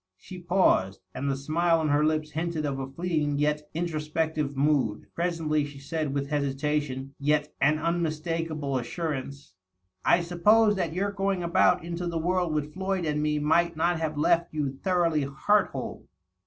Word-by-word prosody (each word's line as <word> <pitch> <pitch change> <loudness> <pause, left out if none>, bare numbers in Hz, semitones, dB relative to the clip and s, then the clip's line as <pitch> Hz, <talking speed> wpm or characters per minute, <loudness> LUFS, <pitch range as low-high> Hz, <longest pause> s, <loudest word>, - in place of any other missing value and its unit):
'' 95 - -60
She 185 - -10
paused, 175 - +2
and 140 - -2
the 135 - 0
smile 165 +4 +1
on 155 -1 0
her 145 +1 +3
lips 155 0 0
hinted 160 -1 -2
of 135 -2 -2
a 135 - -3
fleeting 150 -1 -1
yet 150 +1 0
intro 165 -2 -1
spective 155 -2 -2
mood. 135 -7 +1
Presently 165 -3 0
she 145 -1 -8
said, 150 +1 -3
with 140 +1 -3
hesitation 140 -1 -1
yet 150 +1 +1
an 150 +3 +4
unmistaka 165 0 -2
ble 140 -3 -1
assurance, 140 - -5 0.3
" 95 0 -49
I 175 - +4
supposed 210 +6 +4
that 170 -3 -1
your 200 +3 -1
going 195 -2 -1
about 175 +1 +3
into 170 +1 -4
the 170 -1 -2
world 175 +1 0
with 150 0 -2
Floyd 190 -1 -2
and 150 -1 0
me 150 0 +1
might 160 +3 +2
not 170 +1 +1
have 155 -2 -2
left 170 +3 +2
you 145 -3 0
thoroughly 170 +1 +1
heart 175 +9 +2
whole.'' - - -6
155 Hz, 180 wpm, -27 LUFS, 145-170 Hz, 0.3 s, an